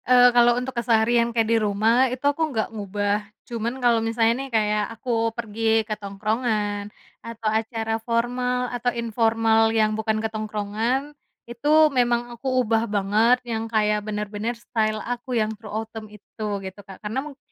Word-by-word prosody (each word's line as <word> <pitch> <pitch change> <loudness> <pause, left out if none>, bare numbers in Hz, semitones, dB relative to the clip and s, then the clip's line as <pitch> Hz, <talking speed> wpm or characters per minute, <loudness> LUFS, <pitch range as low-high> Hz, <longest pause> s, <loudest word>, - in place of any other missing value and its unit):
Eee, 245 -1 +7
kalau 240 0 +5
untuk 250 +1 -3
keseharian 235 0 +2
kayak 230 -1 +1
di 230 +1 +2
rumah 220 +5 +3
itu 255 +3 -6
aku 310 +3 +2
nggak 225 -3 -2
ngubah, 205 0 -1 0.2
cuman 235 0 -3
kalau 240 -3 +3
misalnya 225 0 +2
nih 270 - -6
kayak 210 -2 +1
aku 230 -2 0
pergi 225 -1 0
ke 215 - -3
tongkrongan 210 0 -2 0.3
atau 230 -1 -9
acara 225 0 -1
formal 250 +2 0
atau 245 0 0
informal 225 -1 +2
yang 215 -1 +2
bukan 220 0 -1
ke 220 - -2
tongkrongan 215 +6 -2 0.3
itu 240 +5 -4 0.2
memang 240 -1 +1
aku 235 +3 -8 0.2
ubah 225 +1 +1
banget 215 +5 +2
yang 225 -1 -3
kayak 210 -1 +1
bener-bener 210 +2 -4
style 215 -2 -1
aku 245 +1 -3
yang 220 -1 0
true 215 0 -12
autumn 220 0 -6
itu 210 +1 -9 0.2
gitu, 190 +1 -8
Kak. 195 -1 -12
Karena 210 +4 -3
mung 285 -1 -9
225 Hz, 160 wpm, -24 LUFS, 215-240 Hz, 0.3 s, Eee